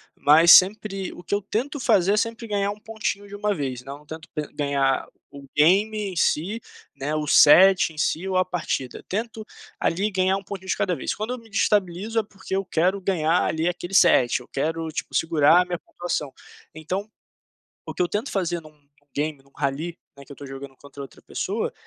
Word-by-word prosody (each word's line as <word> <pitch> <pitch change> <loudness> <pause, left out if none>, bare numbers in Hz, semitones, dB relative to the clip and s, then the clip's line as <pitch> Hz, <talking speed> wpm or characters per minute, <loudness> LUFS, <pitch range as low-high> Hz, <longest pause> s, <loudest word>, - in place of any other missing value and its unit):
mas 160 +4 +6
sempre 195 0 +5
o 175 - -12
que 170 - -5
eu 205 - -1
tento 255 +9 -3
fazer 195 -4 +3
é - - +1
sempre 230 +1 -2
ganhar 200 -1 0
um 210 - -9
pontinho 215 -2 -4
de 200 - -9
uma 205 0 0
vez, 130 -7 -4
né, - - -23
não 145 +2 -10
tento 160 +1 -9 0.3
ganhar 140 -2 0 0.2
o 140 0 -11
game 195 +8 +4 0.2
em - - -9
si, 175 +6 0 0.4
né, 140 +2 -3
o 150 -1 -2
set 185 +2 +6
em - - -18
si 175 +4 0
ou 190 - -2
a 185 - +4
partida. 170 -7 -4
Tento 220 +2 -4 0.3
ali 195 +6 0
ganhar 190 -1 +1
um 195 - -8
pontinho 190 -1 -8
de - - 0
cada 180 - 0
vez. - - -3
Quando 220 +4 -4
eu - - -5
me 230 -2 -15
desestabilizo 200 +1 0
é 225 - +3
porque 195 -2 -7
eu 195 0 -1
quero 180 +4 +1
ganhar 175 -3 +1
ali 160 +2 -1
aquele 175 +1 -4
set, 125 -10 +5
eu 125 - -15
quero, 160 +3 -2
tipo, 155 - -6
segurar 160 +1 +4
a - - -1
minha 180 -1 -3
pontuação, 155 -7 -4 0.4
então, 180 +6 -4 0.8
o - - -6
que - - -3
eu 180 - +2
tento 210 +9 -3
fazer 175 -3 -1
em - - -20
um 150 -2 -23 0.3
game, 150 -1 -3
em - - -27
um - - -26
rally, 150 +5 -3 0.2
né, 140 - -13
que 140 - -16
eu - - -7
estou 140 - -10
jogando 135 0 -9
contra 140 0 -12
outra 135 -3 -11
pessoa, - - -3
175 Hz, 215 wpm, -24 LUFS, 150-200 Hz, 0.8 s, mas